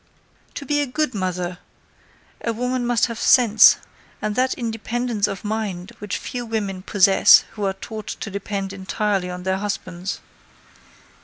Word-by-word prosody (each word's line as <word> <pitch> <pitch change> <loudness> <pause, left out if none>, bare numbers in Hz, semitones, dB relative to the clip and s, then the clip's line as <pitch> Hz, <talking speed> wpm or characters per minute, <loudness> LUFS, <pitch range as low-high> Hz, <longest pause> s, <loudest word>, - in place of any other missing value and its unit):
To 280 - -6
be 290 +2 +1
a 290 - -1
good 300 +1 -1
mother 180 -2 -3 0.8
a 230 - -1
woman 250 +1 -1
must 240 -2 +3
have 230 -2 -6
sense, 230 -4 +6 0.4
and 215 0 -2
that 255 +4 +1
independence 230 -1 -2
of 195 0 -6
mind 205 -4 -3
which 205 -2 -3
few 245 -2 -5
women 210 -5 -3
possess 195 0 +6
who 210 -2 -4
are 195 - 0
taught 215 +2 -8
to 205 - -5
depend 200 0 -4
entirely 195 -1 -1
on 180 0 -6
their 190 0 0
husbands. 190 -2 -4
210 Hz, 150 wpm, -22 LUFS, 190-235 Hz, 0.8 s, sense